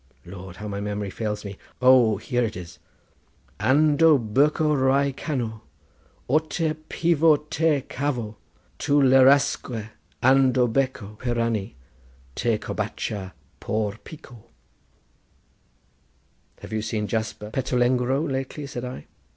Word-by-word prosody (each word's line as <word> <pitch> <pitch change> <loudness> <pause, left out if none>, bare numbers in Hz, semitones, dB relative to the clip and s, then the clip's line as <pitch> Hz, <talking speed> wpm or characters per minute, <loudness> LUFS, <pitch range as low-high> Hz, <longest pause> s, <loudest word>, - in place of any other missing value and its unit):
Lord, 90 0 -10
how 105 +4 -7
my 100 -1 -4
memory 105 -1 -3
fails 105 -1 -4
me. 100 -1 -8 0.2
O, 125 -4 +5
here 125 +4 -1
it 110 -5 -3
is:— 85 -2 -10 0.8
"Ando 150 +2 +4 0.2
berkho 150 +3 +3
Rye 135 +1 +2
canó 120 -6 -4 0.7
Oteh 155 +3 0 0.2
pivò 165 -2 +3
teh 155 -2 +2
khavó.— 125 -6 -3 0.5
Tu - - -1
lerasque 130 -4 +3 0.3
ando 130 -1 +4
berkho 115 -4 -2
piranee 115 - -1 0.6
Teh 115 - 0
corbatcha 105 -3 -4 0.3
por 105 -1 -2
pico." 120 -8 -13 2.2
"Have - - -9
you 110 - -1
seen 110 -1 -2
Jasper 110 0 -4
Petulengro 125 +3 +1
lately?" 135 +2 -4
said 125 -3 -6
I. 125 - -7
125 Hz, 110 wpm, -24 LUFS, 105-140 Hz, 2.2 s, O